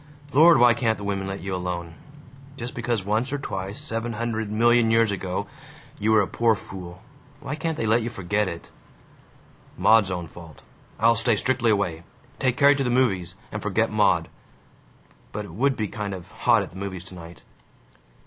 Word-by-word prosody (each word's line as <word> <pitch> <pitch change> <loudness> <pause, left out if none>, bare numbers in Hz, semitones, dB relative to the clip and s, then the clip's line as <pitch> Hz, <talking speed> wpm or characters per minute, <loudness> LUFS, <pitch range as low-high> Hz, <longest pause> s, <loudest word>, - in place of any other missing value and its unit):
Lord, 165 +4 +7
why 120 -1 +6
can't 110 -2 0
the 100 - -8
women 100 -1 -2
let 95 0 -5
you 95 0 -4
alone? 90 -2 -4 0.6
Just 120 +1 -6
because 120 -6 -2
once 110 +6 0
or 145 - -1
twice, 95 -6 -5
seven 115 +1 -3
hundred 110 -1 -3
million 120 +1 +4
years 115 -1 +3
ago, 95 0 -3 0.5
you 110 +2 +1
were 110 -1 +5
a - - -3
poor 115 -1 +2
fool, 90 -3 -10 0.4
why 135 - -5
can't 160 +1 -3
they 115 - -2
let 110 +2 +3
you 115 - -3
forget 105 -1 -1
it? 85 -2 -7 1.1
Maud's 110 -3 +5
own 90 -2 -3
fault. 80 -1 -13 0.4
I'll 115 +1 +5
stay 115 0 +2
strictly 120 +2 +1
away. 95 -6 0 0.4
Take 130 -2 +1
Carrie 140 0 +6
to 135 - 0
the 125 - -1
movies, 95 -9 +1 0.2
and - - -5
forget - - 0
Maud.... - - +2 1.0
But - - -5
it - - -11
would 135 +7 +1
be 110 - -1
kind 100 -1 -5
of 90 -2 -10
hot - - +3
at - - -9
the 95 - -12
movies 95 -3 -5
tonight." 85 -2 -12
110 Hz, 185 wpm, -24 LUFS, 95-120 Hz, 1.1 s, Lord